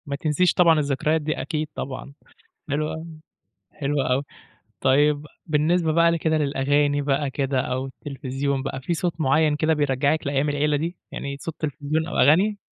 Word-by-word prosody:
ما 140 -2 -3
تنسيش 155 +4 +2
طبعًا 165 -3 +5
الذكريات 150 +2 0
دي، 155 +1 -2
أكيد 155 -2 -2
طبعًا. 140 +1 -6 0.6
حلوة 150 +2 -1
أوي، 160 +1 -7 0.7
حلوة 140 -2 -1
أوي. 135 +2 0 0.6
طيب، 145 +2 +3 0.2
بالنسبة 160 +1 +2
بقى 170 +1 +4
ل - - +1
كده 160 -1 +1
للأغاني 145 0 +1
بقى 140 0 0
كده 135 -1 0
أو 130 +1 -2
التلفزيون 135 0 -3
بقى، 135 -1 -4
في 170 +6 -1
صوت 170 0 -2
معيّن 150 +2 +3
كده 160 +1 +2
بيرجّعك 145 +1 +1
لأيام 140 +1 +1
العيلة 145 +1 +1
دي؟ 165 +4 -3 0.2
يعني 140 0 -5
صوت 165 - -5
تلفزيون 155 +1 -2
أو 175 - -5
أغاني؟ 190 +9 +4
150 Hz, 165 wpm, -24 LUFS, 140-160 Hz, 0.7 s, طبعًا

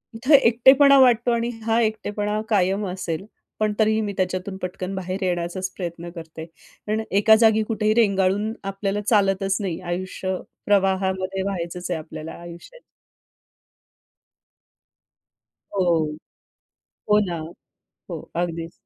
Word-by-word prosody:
इथे 265 +6 +4
एकटेपणा 270 +4 +6
वाटतो. 240 -2 +4
आणि 235 0 0 0.2
हा 225 0 +2
एकटेपणा 210 -1 -1
कायम 195 0 +1
असेल. 180 -1 -4 0.3
पण 215 -1 +1
तरीही 220 0 +3
मी 205 -2 -3
त्याच्यातून 185 +1 -2
पटकन 185 0 -5
बाहेर 190 +1 -4
येण्याचाच 180 +1 -2
प्रयत्न 170 -1 -5
करते 160 -1 -8 0.5
आणि 220 +1 0
एका 220 +2 +6
जागी 220 -1 +4
कुठेही 215 -1 0
रेंगाळून 200 -1 +2
आपल्याला 195 +1 -2
चालतच 195 -2 +2
नाही. 180 -4 -3
आयुष्य 185 +1 -3 0.3
प्रवाहामध्ये 190 -1 +1
व्हायचंच 180 -2 -4
आहे 165 - -1
आपल्याला 155 0 -8
आयुष्याच्या. 175 - -12 3.0
हो, 190 - +2 1.3
हो 210 - +6
ना, 170 -2 -3 0.7
हो, - - -5 0.2
अगदीच. 170 -1 -3
195 Hz, 115 wpm, -23 LUFS, 180-215 Hz, 3.0 s, एकटेपणा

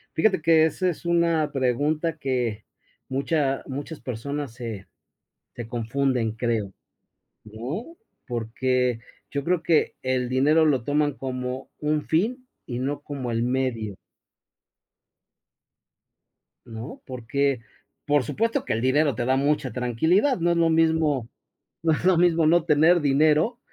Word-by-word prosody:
Fíjate 175 -2 +2
que, 160 -1 +5
esa 185 +3 -1
es 175 - -6
una 170 -2 +2
pregunta 145 +5 0
que, 120 -6 -2 0.4
mucha 135 0 0
muchas 145 +3 -6
personas 135 +2 -5
se 115 -5 -7 0.7
se 120 -2 -6
confunden, 120 0 -1
creo, 115 -4 -2 0.7
¿no?, 130 - -6 0.3
porque 125 +1 -1 0.3
yo 140 -1 -3
creo 175 +2 +1
que 165 -2 +2
el 130 -1 -1
dinero 150 +5 +4
lo 140 -6 +2
toman 145 +2 +1
como 130 -1 -5
un 150 0 0
fin 245 +10 0 0.2
y 120 -2 -4
no 145 +3 -2
como 140 -4 -5
el 115 0 0
medio. 120 -5 -1 2.7
¿No?, 115 +4 -8
porque, 130 +2 -1 0.5
por 145 -2 +3
supuesto 225 - -1
que - - -1
el 110 - -1
dinero 140 +2 +2
te 120 - -2
da 130 +1 +2
mucha 140 -1 +1
tranquilidad, 160 - +2
no 170 +1 +2
es 170 - +1
lo 165 -1 +3
mismo 160 -6 +2 0.5
no 165 - +3
es 155 - -3
lo 185 -2 +5
mismo 170 -2 +4
no 170 +1 +4
tener 165 +2 +4
dinero 155 - +3
140 Hz, 135 wpm, -25 LUFS, 125-160 Hz, 2.7 s, que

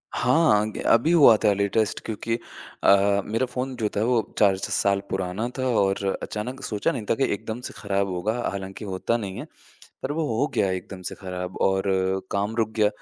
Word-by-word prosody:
हाँ, 125 -5 +3
ग - - -9
अभी 120 +8 +4
हुआ 145 -9 +8
था 105 - +5
लेटेस्ट 100 +2 0
क्योंकि 115 +1 -2 0.5
अ, 100 0 +5
मेरा 115 +4 0
फ़ोन 125 +1 -4
जो 110 -3 -1
था 105 - +2
वो 120 -1 +3 0.2
चार 100 -2 +4
च - - -5
साल 100 0 +2
पुराना 95 +4 -2
था 130 - -1
और 95 0 +1 0.2
अचानक 125 +5 -5
सोचा 105 -2 0
नहीं 110 - -5
था - - +3
कि 135 - 0
एकदम 110 +3 -5
से - - -7
खराब 100 -1 -1
होगा 90 +4 -1 0.2
हालाँकि 95 +1 -6
होता 95 +4 -1
नहीं 100 -4 -5
है। - - -6 0.6
पर 135 - -2
वो 160 +1 -1
हो 140 - +2
गया 95 - +2
एकदम 95 0 -5
से - - -4
खराब 90 -1 -6
और 95 0 +2 0.5
काम 100 +2 -1
रुक 110 -2 +1
गया। 105 -1 +4
105 Hz, 200 wpm, -25 LUFS, 95-115 Hz, 0.6 s, हुआ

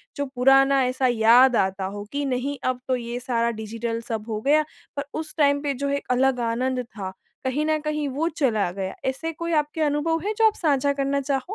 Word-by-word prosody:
जो 285 - -2
पुराना 270 +1 +4
ऐसा 255 +1 +1
याद 240 +2 +5
आता 190 -1 0
हो 205 0 -6
कि 285 0 -2
नहीं 270 +2 -2
अब 255 -1 -2
तो 255 - +2
ये 240 0 -4
सारा 235 -1 0
डिजिटल 230 +1 -4
सब 220 -2 -3
हो 215 -1 -2
गया 300 +3 +3 0.3
पर 280 - -2 0.2
उस 315 -1 -7
टाइम 285 -1 +3
पे 285 -2 -1
जो 280 +2 -3
एक 280 0 -2
अलग 255 0 +2
आनंद 255 +2 -1
था, 200 -5 -7 0.3
कहीं 270 +4 0
न 310 0 +1
कहीं 300 -1 -2
वो 300 +5 -1
चला 230 - 0
गया। 190 0 -5
ऐसे 325 +5 -4
कोई 335 +1 -4
आपके 300 +2 -3
अनुभव 300 +2 +1
हैं 425 - 0
जो 450 - +4
आप 430 - 0
साझा 285 -3 +1
करना 280 0 0
चाहो? 270 -1 -1
265 Hz, 215 wpm, -24 LUFS, 235-290 Hz, 0.3 s, याद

